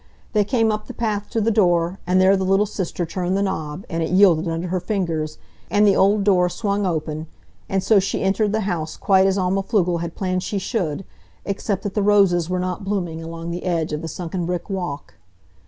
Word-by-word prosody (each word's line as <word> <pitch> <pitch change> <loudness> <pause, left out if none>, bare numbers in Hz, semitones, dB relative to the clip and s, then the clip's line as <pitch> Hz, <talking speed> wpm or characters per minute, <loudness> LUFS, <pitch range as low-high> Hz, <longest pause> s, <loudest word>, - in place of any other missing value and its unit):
They 210 -2 +4
came 225 0 +1
up 215 0 -4
the - - -8
path 210 -3 -2
to 225 - -1
the 225 +1 +2
door, 175 -3 +2
and 185 +1 +3
there 190 +1 +5
the 190 - -1
little 195 +2 +3
sister 185 -4 -3
turned 180 +3 -2
the 200 - +1
knob, 160 -2 -3
and 165 0 -3
it 160 - -1
yielded 180 -3 +4
under 165 +2 -2
her 185 +1 0
fingers, 170 -5 -2 0.3
and 210 0 +4
the 200 -2 +5
old 200 +1 +3
door 180 -3 +3
swung 200 +1 -1
open; 155 -2 -3 0.4
and 190 -1 0
so 215 -3 +5
she 195 - -1
entered 200 +2 +1
the 220 +1 0
house 175 -6 -3
quite 190 -1 +4
as 195 0 +1
Alma 190 +1 +1
Pflugel 180 -5 0
had 170 -1 -5
planned 185 -1 -1
she 205 - -3
should, 190 - -2 0.4
except 200 0 -2
that 205 - -3
the 210 - 0
roses 195 -4 +3
were 185 - 0
not 180 +1 -3
blooming 180 -5 -2
along 165 +1 -6
the 175 - -5
edge 165 -4 -1
of 150 - -2
the 165 - -5
sunken 170 +1 -4
brick 180 +3 -3
walk. 175 -7 -4
185 Hz, 220 wpm, -22 LUFS, 170-200 Hz, 0.4 s, there